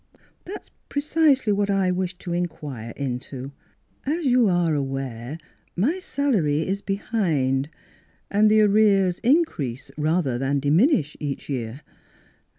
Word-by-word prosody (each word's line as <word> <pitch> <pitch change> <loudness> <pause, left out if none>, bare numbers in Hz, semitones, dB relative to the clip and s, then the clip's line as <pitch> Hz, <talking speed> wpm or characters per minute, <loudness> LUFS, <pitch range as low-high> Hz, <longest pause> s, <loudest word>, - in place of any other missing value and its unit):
That's 405 +3 -9 0.2
precisely 285 -6 +2
what 205 0 0
I 195 -2 +2
wish 185 0 -2
to 175 -2 -5
in 175 0 0
quire 140 -8 -8
into. 130 0 -4 0.5
As 310 +4 -2
you 245 -4 +4
are 175 -3 +2
aware, 135 -1 -3 0.4
my 280 - +1
salary 205 - 0
is 195 +1 -1
behind; 160 - 0 0.6
and 210 +1 +4
the 215 0 +5
arrears 200 -3 +4
increase 150 - 0
rather 155 -5 0
than 135 +2 0
diminish 150 - +3
with 150 - -2
each 140 - -5
year. 125 0 -4
175 Hz, 130 wpm, -24 LUFS, 140-215 Hz, 0.6 s, the